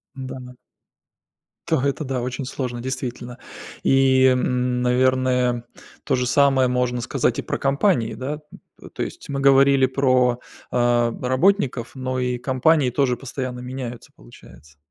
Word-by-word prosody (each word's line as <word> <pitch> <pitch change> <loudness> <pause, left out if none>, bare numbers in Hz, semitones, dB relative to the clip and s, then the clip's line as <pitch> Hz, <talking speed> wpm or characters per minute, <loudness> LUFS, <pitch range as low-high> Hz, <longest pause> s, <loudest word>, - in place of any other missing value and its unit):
Да, 130 -1 -7
но 125 0 -11 1.1
Та, - - +1
это 140 +2 -1
да, 130 -2 -2
очень 130 +2 -4
сложно 125 -2 -4
действительно. 125 -1 -5 0.4
И, 135 -1 +4
м, 125 -1 +1
наверное, 125 -1 +1 0.4
тоже 125 0 0
самое 135 -1 +3
можно 125 -1 -1
сказать 125 -1 -1
и - - -1
про - - -3
компании 135 - +1
да? 140 +3 -4 0.4
Т - - -12
то - - -3
есть, 350 - -8
мы 140 -1 -2
говорили 135 0 +5
про, 130 -2 +2 0.3
а, 120 -1 +2
работников, 130 - +1
но 130 0 -3
и 125 -1 -1
компании 130 +3 +2
тоже 125 -1 +1
постоянно 130 -1 -5
меняются 125 -2 -7
получается. 75 +5 -17
130 Hz, 135 wpm, -22 LUFS, 125-135 Hz, 1.1 s, говорили